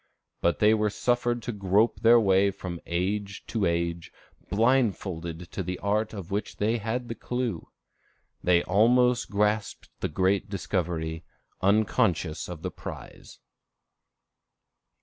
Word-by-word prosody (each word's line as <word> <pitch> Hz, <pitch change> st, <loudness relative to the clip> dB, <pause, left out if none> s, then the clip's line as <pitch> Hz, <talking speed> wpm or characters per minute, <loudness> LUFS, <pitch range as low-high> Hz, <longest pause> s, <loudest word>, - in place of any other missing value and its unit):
But 85 Hz, -, +2 dB
they 105 Hz, +1 st, +5 dB
were 105 Hz, -1 st, +2 dB
suffered 120 Hz, +2 st, 0 dB
to 120 Hz, -, -3 dB
grope 100 Hz, +2 st, +2 dB
their 115 Hz, +1 st, +6 dB
way 100 Hz, -2 st, +4 dB
from 95 Hz, -3 st, -6 dB
age 95 Hz, +3 st, -2 dB
to 105 Hz, -6 st, 0 dB
age 85 Hz, 0 st, -2 dB, 0.4 s
blindfolded 95 Hz, -7 st, 0 dB
to -, -, -3 dB
the 90 Hz, 0 st, -3 dB
art 105 Hz, +2 st, 0 dB
of 100 Hz, -3 st, -8 dB
which 105 Hz, +2 st, -3 dB
they 110 Hz, +3 st, +1 dB
had 115 Hz, +3 st, -3 dB
the 115 Hz, -, -3 dB
clew. 120 Hz, -7 st, -3 dB, 0.7 s
They 90 Hz, -1 st, +4 dB
almost 125 Hz, +5 st, +3 dB
grasped 105 Hz, 0 st, -1 dB
the -, -, -2 dB
great 95 Hz, +5 st, +1 dB
discovery, 85 Hz, -4 st, -2 dB, 0.4 s
unconscious 95 Hz, -6 st, +1 dB
of 85 Hz, -3 st, -8 dB
the -, -, -3 dB
prize. -, -, -10 dB
100 Hz, 130 wpm, -27 LUFS, 90-110 Hz, 0.7 s, their